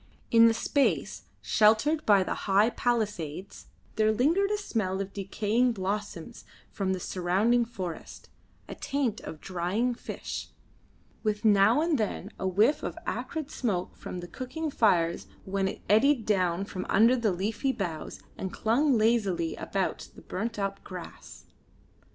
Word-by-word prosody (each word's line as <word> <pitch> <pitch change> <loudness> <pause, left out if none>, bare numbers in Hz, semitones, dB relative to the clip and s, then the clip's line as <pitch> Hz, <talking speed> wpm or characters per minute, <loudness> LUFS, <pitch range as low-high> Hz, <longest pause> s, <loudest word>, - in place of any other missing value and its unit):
In 230 0 +8
the 225 - +4
space 280 +4 0 0.2
sheltered 225 +9 +3
by 200 -3 +6
the - - -2 0.2
high 205 +4 +4
palisades 205 -9 -2 0.3
there 215 0 +4
lingered 325 - +2
the 420 - 0
smell 210 - -2
of 195 0 -4
decaying 215 +5 0
blossoms 195 -4 -4 0.3
from 190 -2 -1
the 185 - -3
surrounding 195 +8 +1
forest, 185 -8 -7 0.4
a - - -6
taint 275 -6 -2
of 155 - -8
drying 190 +8 -1
fish; - - -6 0.7
with 215 0 -1
now 210 +6 +5
and 325 -4 +1
then 210 -1 -3
a 190 - -1
whiff 210 +10 +3
of - - -5
acrid 310 -3 -4
smoke 195 -8 -2
from 180 - -7
the 175 - -7
cooking 275 - -5
fires 170 -9 +2 0.2
when 195 0 0
it - - -6
eddied 230 +3 +4
down 185 -2 +1
from 185 -2 -6
under 230 +5 +5
the 230 -5 +1
leafy 210 +8 -1
boughs 175 -10 -5 0.2
and 190 - -3
clung 250 +6 +2
lazily 210 -7 +1
about 195 -1 -3
the - - -12
burnt 225 +4 -4
up 195 -1 -3
grass. 180 -3 -10
210 Hz, 145 wpm, -28 LUFS, 190-240 Hz, 0.7 s, In